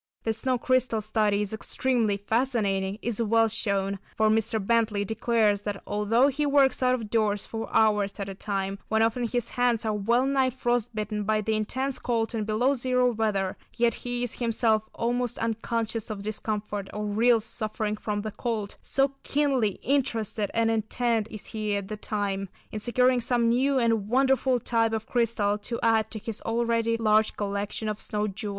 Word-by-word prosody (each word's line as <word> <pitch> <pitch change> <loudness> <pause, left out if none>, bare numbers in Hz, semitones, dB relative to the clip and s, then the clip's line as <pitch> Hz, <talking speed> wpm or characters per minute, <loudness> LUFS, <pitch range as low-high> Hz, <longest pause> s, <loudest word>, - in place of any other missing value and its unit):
That 225 - 0
snow 250 +3 0
crystal 255 -2 +1
study 210 -1 +1
is 205 - -3
extremely 225 -2 0
fascinating 205 -3 0
is 235 -1 -1
well 225 0 +3
shown, 200 -3 0 0.2
for 220 0 +4
Mr. 220 +1 +1
Bentley 215 -1 +1
declares 220 -1 +1
that 205 -1 -5
although 215 +5 +2
he 285 +2 -1
works 280 -2 +3
out 255 0 +3
of 220 -4 -7
doors 210 -3 +1
for 225 0 -6
hours 210 -2 +2
at 200 - -3
a 195 - -5
time, 195 0 -3
when 220 +1 +2
often 235 +2 +1
his 245 0 -1
hands 245 -2 +1
are 215 - +1
well 235 +5 +2
nigh 270 -1 +2
frost 240 -2 -1
bitten 210 -1 -2
by 215 +1 +1
the 220 +1 -1
intense 255 +5 -1
cold, 230 -1 -1
in 220 -2 -2
below 230 +6 +2
zero 250 -1 +2
weather, 210 -4 -1 0.2
yet 235 -1 +3
he 245 +1 -4
is 245 - -4
himself 225 -2 +1
almost 245 +1 -1
unconscious 225 0 -2
of 205 -2 -5
discomfort 210 -1 -3
or 210 0 -4
real 225 +3 +3
suffering 215 -1 -3
from 210 -1 -3
the 215 - -4
cold, 215 -3 -3
so 275 0 +1
keenly 270 -8 +1
interested 230 -6 0
and 225 0 +3
intent 225 0 0
is 215 - -8
he 215 -2 -1
at 200 -1 -4
the 215 - -3
time, 200 -2 -2 0.2
in 215 - -4
securing 250 +2 +2
some 235 0 +1
new 265 +4 +2
and 225 -4 +1
wonderful 265 0 +3
type 225 -1 +1
of 220 0 -2
crystal 220 -4 0
to 230 +3 -4
add 220 -1 +3
to 220 - -6
his 220 +1 -6
already 230 0 0
large 215 -1 +2
collection 205 +1 -3
of 210 0 -3
snow 210 0 -2
jewels. 210 +1 -5
225 Hz, 180 wpm, -27 LUFS, 210-240 Hz, 0.2 s, for